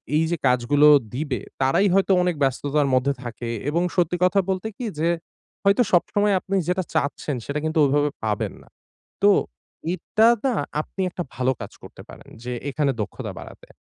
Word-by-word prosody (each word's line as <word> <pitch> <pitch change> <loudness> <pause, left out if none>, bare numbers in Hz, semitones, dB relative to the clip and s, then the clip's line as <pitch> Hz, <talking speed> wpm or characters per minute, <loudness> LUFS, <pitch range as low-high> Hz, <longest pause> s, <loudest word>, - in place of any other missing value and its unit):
এই 155 - +3
যে 170 - 0
কাজগুলো 125 +4 +4 0.3
দিবে। 135 -2 -2 0.2
তারাই 135 +10 +3
হয়তো 195 0 +3
অনেক 180 -1 0
ব্যস্ততার 140 +2 +1
মধ্যে 130 +2 +2
থাকে 120 0 -6 0.2
এবং 165 +3 +1
সত্যি 180 -1 +1
কথা 185 +2 +4
বলতে 190 +3 -1
কি 250 - -4
যে, 165 +2 +2 0.5
হয়তো 200 +4 +4
সবসময় 205 +3 +2
আপনি 195 +2 -3
যেটা 180 +1 0
চাচ্ছেন 145 0 -1
সেটা 145 +1 -2
কিন্তু 160 0 0
ওইভাবে 145 +1 +2 0.2
পাবেন 105 -1 -1
না। - - -20 0.6
তো, 205 - +7 0.6
এটা 215 +5 +2 0.2
না 260 -3 +2 0.3
আপনি 190 - -7
একটা 175 - -4
ভালো 130 +1 +1
কাজ 100 - -7
করতে - - -12
পারেন - - -13
যে 125 - -4 0.2
এখানে 145 0 0
দক্ষতা 105 - -5
বাড়াতে। - - -12
150 Hz, 170 wpm, -23 LUFS, 135-185 Hz, 0.6 s, তো